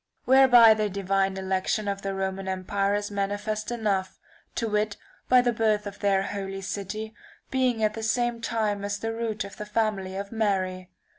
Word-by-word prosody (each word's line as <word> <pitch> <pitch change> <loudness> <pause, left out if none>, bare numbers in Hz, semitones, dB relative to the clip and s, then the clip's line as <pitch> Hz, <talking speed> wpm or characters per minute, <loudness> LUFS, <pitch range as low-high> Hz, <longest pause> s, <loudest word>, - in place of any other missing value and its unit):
Whereby 245 -4 +8
the 215 -1 -1
divine 195 0 0
election 190 +2 -1
of 200 0 -2
the 195 0 -3
Roman 190 0 -3
empire 195 +2 0
is 205 0 -3
manifest 205 +2 -2
enough; 205 -5 -1 0.4
to 230 - -1
wit 210 -1 0 0.3
by 250 0 +7
the 245 -1 +1
birth 215 -2 +1
of 205 0 -7
the 195 -2 +2
holy 195 -1 -4
city 210 +3 -5 0.4
being 255 -4 +1
at 215 0 +2
the 225 - -6
same 240 +1 0
time 215 -3 -1
as 200 0 -2
the 225 +2 -3
root 225 -2 -2
of 200 - -10
the 210 - -5
family 210 -3 -1
of 200 0 -5
Mary. 190 -4 -1
205 Hz, 175 wpm, -26 LUFS, 195-220 Hz, 0.4 s, Whereby